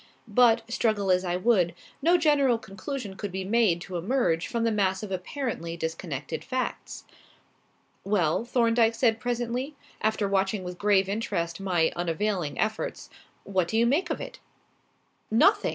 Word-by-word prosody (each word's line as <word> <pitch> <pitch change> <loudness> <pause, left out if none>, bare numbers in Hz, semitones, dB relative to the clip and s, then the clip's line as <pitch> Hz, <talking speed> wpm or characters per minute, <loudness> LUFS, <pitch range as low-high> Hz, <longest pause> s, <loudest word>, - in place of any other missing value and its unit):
But, 230 +1 +4
struggle 215 -4 +1
as 180 0 +3
I 175 -1 -1
would, 180 -4 +2 0.3
no 340 +5 +5
general 285 -7 +3
conclusion 205 +1 -6
could 205 0 -5
be 190 +1 -3
made 200 -4 +2
to 180 -1 -5
emerge 175 -3 0
from 235 -1 -2
the 230 - +2
mass 190 -2 0
of 205 - -6
apparently 185 - -4
disconnected 160 -3 -4
facts. 255 -1 -4 1.0
"Well?" 195 -2 +1
Thorndyke 230 -1 +2
said 225 -2 +2
presently, 245 +4 -2 0.3
after 215 -1 +1
watching 195 0 0
with 180 0 -7
grave 200 -2 +3
interest 195 -5 -2
my 180 -4 +1
unavailing 175 -1 -1
efforts; 220 0 -2 0.3
"what 190 -3 0
do 220 - -1
you 230 - +4
make 315 +9 +1
of 315 - -2
it?" - - -8 0.9
"Nothing!" 390 - +4
210 Hz, 150 wpm, -27 LUFS, 180-235 Hz, 1.0 s, no